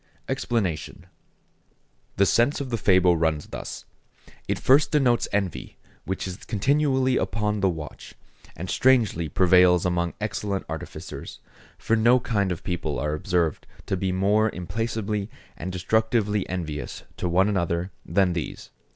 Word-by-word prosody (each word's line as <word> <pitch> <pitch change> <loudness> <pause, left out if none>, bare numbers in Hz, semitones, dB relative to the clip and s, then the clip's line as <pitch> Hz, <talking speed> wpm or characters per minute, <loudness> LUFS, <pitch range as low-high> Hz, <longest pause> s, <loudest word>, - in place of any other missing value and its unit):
EXPLANATION.—The 100 - -4
sense 120 +9 +3
of 135 -3 -5
the 115 - 0
fable 90 -4 +4
runs 80 -2 0
thus. - - -7 0.6
It - - 0
first 140 +3 +4
denotes 130 -6 +3
envy, 100 -4 -2 0.3
which 95 +1 -3
is 90 -1 -6
continually 130 +2 +2
upon 105 -2 -1
the 95 -1 +3
watch, 80 -3 -7 0.4
and 90 - -6
strangely 110 -10 +2
prevails 90 0 +5
among 85 -1 0
excellent 100 -2 -3
artificers; - - -7 0.4
for 115 - +1
no 120 +3 +5
kind 100 -6 0
of 85 - -4
people 85 -7 -2
are 75 +4 -1
observed 85 +1 -1 0.2
to - - -1
be 95 0 -1
more 100 +4 +2
implacably 105 +2 -3 0.3
and 90 +3 -5
destructively 105 +2 0
envious 80 -5 -4
to 90 - -2
one 95 +3 +3
another 85 -2 -1
than 95 -3 +2
these. 85 -2 -5
95 Hz, 135 wpm, -25 LUFS, 90-110 Hz, 0.6 s, prevails